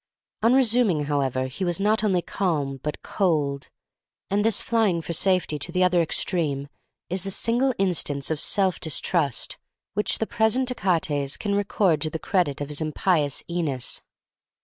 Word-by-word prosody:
On 230 +4 +4
resuming, 235 - +3
however, 135 -3 -1
he 130 +9 -5
was 175 0 0
not 210 +2 +2
only 185 -5 +1
calm, 145 -8 -2
but 150 - -5
cold; 150 -8 -1 0.6
and 205 +1 +2
this 225 -1 +3
flying 220 -7 +1
for 165 +1 -5
safety 180 -3 +1
to - - -3
the 185 0 +2
other 180 -1 +3
extreme 150 -4 -1 0.4
is 185 +1 +1
the 195 - -4
single 240 +7 +2
instance 160 -7 0
of 155 - -1
self 190 +1 +2
distrust 160 - 0 0.3
which 210 +1 +2
the 220 - -1
present 230 +4 +1
Achates 160 - 0
can 205 -2 -2
record 200 -5 +1
to 155 - 0
the 160 - -4
credit 160 -5 0
of 145 - -4
his 150 +1 -2
impious 155 -1 0
Æneas. 160 -7 -2
175 Hz, 160 wpm, -24 LUFS, 145-200 Hz, 0.6 s, On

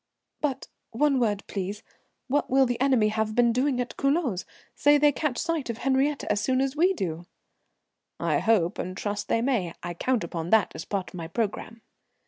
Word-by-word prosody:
"But 275 -3 -2 0.2
one 275 +3 +2
word, 210 -4 0
please. 200 +2 -4 0.4
What 285 +2 0
will 265 +1 +5
the 245 0 -2
enemy 255 -6 +3
have 215 0 -1
been 240 -1 +4
doing 255 +1 +1
at 245 -1 -3
Culoz? 275 - 0 0.3
Say 290 +4 +4
they 295 0 +5
catch 285 -3 -2
sight 330 -6 -2
of 230 - -3
Henriette 270 +3 +1
as 210 0 0
soon 260 -1 +1
as 270 +1 0
we 350 +5 +4
do?" 170 - -4 0.9
"I - - +1
hope 205 -6 +2
and 185 +1 -4
trust 205 0 -3
they 230 - +1
may. 220 -11 0
I 175 - -4
count 245 +7 0
upon 165 -1 -4
that 220 0 +4
as - - -7
part 195 -3 -3
of - - -12
my 165 -2 -5
programme." 225 +3 -3
235 Hz, 190 wpm, -26 LUFS, 205-270 Hz, 0.9 s, will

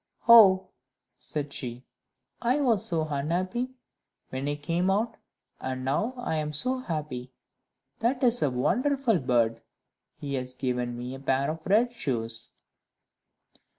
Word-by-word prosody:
"Oh," 200 -5 +8 0.5
said 145 -2 -4
she, 125 -1 -6 0.6
"I 250 +4 +2
was 235 -8 +2
so 165 -3 +1
unhappy 180 - -1 0.6
when 130 +2 -3
I 145 - 0
came 170 +5 0
out, 215 +4 +1 0.4
and 130 0 -4
now 215 - 0
I 245 -10 -2
am 150 0 -2
so 255 - +1
happy! 150 - -4 0.7
That 250 +3 0
is 245 -1 +4
a 145 - +3
wonderful 245 - +1
bird; 115 -3 +1 0.5
he 140 -1 -6
has 130 -1 -3
given 125 -2 -2
me 125 +1 -5
a 135 - -7
pair 135 +1 +1
of 160 0 -8
red 230 +5 +3
shoes." 115 - -2
150 Hz, 135 wpm, -27 LUFS, -, 0.7 s, Oh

